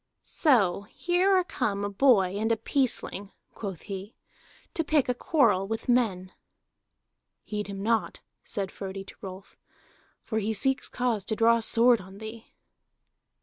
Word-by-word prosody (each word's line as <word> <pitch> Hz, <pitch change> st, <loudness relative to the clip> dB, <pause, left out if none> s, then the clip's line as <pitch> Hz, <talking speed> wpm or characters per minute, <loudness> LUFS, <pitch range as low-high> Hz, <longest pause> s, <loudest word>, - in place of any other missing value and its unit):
"So 210 Hz, -, +3 dB
here 365 Hz, +2 st, +2 dB
are 370 Hz, -, +3 dB
come 205 Hz, -, -2 dB
a -, -, -2 dB
boy 200 Hz, -5 st, +4 dB
and 220 Hz, +2 st, 0 dB
a 225 Hz, -, +2 dB
peaceling," 225 Hz, -5 st, 0 dB, 0.2 s
quoth 195 Hz, -6 st, -6 dB
he, 200 Hz, +1 st, -7 dB, 0.6 s
"to 325 Hz, -, 0 dB
pick 300 Hz, -3 st, +2 dB
a 250 Hz, -, +1 dB
quarrel 245 Hz, -, +2 dB
with 225 Hz, +1 st, -4 dB
men." 205 Hz, -7 st, +1 dB, 1.1 s
"Heed 210 Hz, -1 st, -4 dB
him 195 Hz, -1 st, -6 dB
not," 225 Hz, +1 st, 0 dB, 0.2 s
said 195 Hz, -4 st, -3 dB
Frodi 195 Hz, 0 st, -6 dB
to -, -, -13 dB
Rolf, 190 Hz, 0 st, -9 dB, 0.7 s
"for 220 Hz, -, -2 dB
he 220 Hz, +1 st, -1 dB
seeks 265 Hz, +5 st, +1 dB
cause 240 Hz, -5 st, -1 dB
to 220 Hz, -, -1 dB
draw 230 Hz, +1 st, +4 dB
sword 230 Hz, 0 st, +3 dB
on 190 Hz, +1 st, -13 dB
thee." 220 Hz, +1 st, -9 dB
220 Hz, 145 wpm, -27 LUFS, 195-245 Hz, 1.1 s, boy